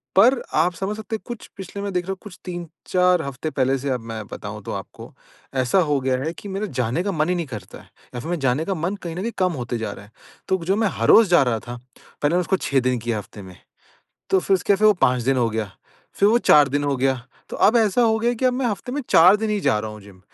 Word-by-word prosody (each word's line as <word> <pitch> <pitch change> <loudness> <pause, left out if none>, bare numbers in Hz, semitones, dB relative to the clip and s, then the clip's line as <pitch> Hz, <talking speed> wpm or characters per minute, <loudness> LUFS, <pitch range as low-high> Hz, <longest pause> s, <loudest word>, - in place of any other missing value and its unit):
पर 240 +6 +5
आप 170 +4 +2
समझ 195 +4 -3
सकते 220 0 -4
हैं - - -7
कुछ 240 -2 -7
पिछले 195 +1 -7
में 200 - -3
देख 180 0 0
रहा 195 - -3
हूँ 190 - -4
कुछ 205 -4 -11
3-4 180 +1 0
हफ्ते 140 +3 -4
पहले 135 -1 +1
से 140 +2 -4
अब 125 -2 0
मैं 110 -1 -5
बताऊँ - - -7
तो - - -6
आपको - - -9 0.5
ऐसा 125 +10 +2
हो 145 -2 +2
गया 130 -1 +1
है 160 +3 -3
कि - - -9
मेरा 195 +2 -3
जाने 125 +9 0
का 200 - -1
मन 155 -1 0
ही 180 - +1
नहीं 170 -2 -2
करता 105 -8 -9
है। - - -17 0.3
या - - -3
फिर 140 - -7
मेरा 175 -2 -1
जाने 135 +4 +1
का 195 - -1
मन 180 +4 -2
कहीं 170 -1 -5
न 185 - -4
कहीं 235 +3 -2
कम 185 -1 +2
होते 120 0 -3
जा 110 -2 -4
रहा 100 - -11
है। 105 - -22 0.4
तो 190 - +2
जो 190 - +2
मैं 220 0 +2
हर - - +1
रोज 225 -2 +8
जा 175 -6 +5
रहा 115 -3 0
था, 120 +2 -8 0.5
पहले 145 - +3
मैंने 180 - +3
उसको 190 +2 0
6 140 -6 +1
दिन 125 -1 0
किया 115 -1 -2
हफ्ते 105 0 -9
में। 95 -2 -12 0.8
तो 190 - +4
फिर 195 - +2
उसके 195 +2 +2
फिर 215 +2 +3
वो 210 - +7
5 125 -8 +2
दिन 135 +2 +1
हो 120 -2 +2
गया, 110 -3 -3 0.4
फिर 200 - +3
वो 230 +3 +4
4 150 - +5
दिन 145 +1 -1
हो 140 -2 0
गया, 135 +1 +2 0.3
तो - - -6
अब 220 - +4
ऐसा 225 +1 +3
हो 220 -1 +3
गया 235 +2 +1
कि 250 - -4
अब 255 - +4
मैं 255 0 -1
हफ्ते 230 +3 -3
में 290 - -2
4 180 +5 +7
दिन 220 0 -2
ही 210 - 0
जा 110 - +2
रहा 110 0 -4
हूँ 105 - -10
जिम। 100 -2 -16
170 Hz, 285 wpm, -22 LUFS, 125-200 Hz, 0.8 s, रोज